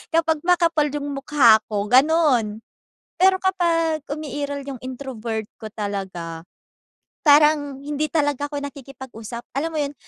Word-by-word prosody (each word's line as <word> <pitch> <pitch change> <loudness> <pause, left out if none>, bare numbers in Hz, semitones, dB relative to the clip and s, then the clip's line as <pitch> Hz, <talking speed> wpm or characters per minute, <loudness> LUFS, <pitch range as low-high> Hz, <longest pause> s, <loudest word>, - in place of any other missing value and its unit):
kapag 325 -1 +2
makapal 335 -4 +3
yung 290 -1 -3
mukha 270 -5 +5
ko, 205 -1 -2
ganun. 255 -5 +3 0.6
Pero 380 0 +6
kapag 330 -4 +1
umiiral 285 -1 -4
yung 270 - -6
introvert 240 -4 -5 0.2
ko - - -8
talaga, 190 -6 -5 0.8
parang 290 -2 +4
hindi 295 +1 -2
talaga 290 -3 +1
ako 290 -1 -4
nakikipag-usap, 265 -5 -8 0.2
alam 320 +4 -1
mo 310 - -1
’yon? 285 0 -3
285 Hz, 125 wpm, -22 LUFS, 235-310 Hz, 0.8 s, Pero